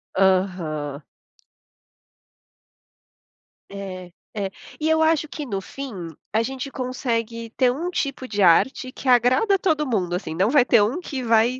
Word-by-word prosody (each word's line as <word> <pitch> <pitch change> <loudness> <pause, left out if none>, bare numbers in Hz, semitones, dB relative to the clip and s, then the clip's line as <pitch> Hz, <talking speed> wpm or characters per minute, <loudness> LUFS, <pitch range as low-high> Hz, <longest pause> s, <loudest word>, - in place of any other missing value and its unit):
Aham. 180 -7 +1 2.7
É, 185 -2 -7 0.2
é. 200 -2 -2 0.3
E 310 +1 0
eu 320 0 +3
acho 315 -1 +3
que 300 -1 -6
no 195 -6 -3
fim, 275 +4 -7 0.4
a 220 - +3
gente 265 +2 -5
consegue 230 -3 -3
ter 250 0 +3
um 330 +7 -3
tipo 275 -6 -3
de 205 -4 -2
arte 255 +9 +4
que 260 - -9
agrada 255 - +4
todo 310 -5 +1
mundo, 185 -7 -1
assim, 170 -3 -4
não 190 +5 +2
vai 270 -1 +5
ter 235 -5 +5
um 230 +11 +1
que 275 -8 -5
vai 230 +2 +3
240 Hz, 145 wpm, -23 LUFS, 195-275 Hz, 2.7 s, vai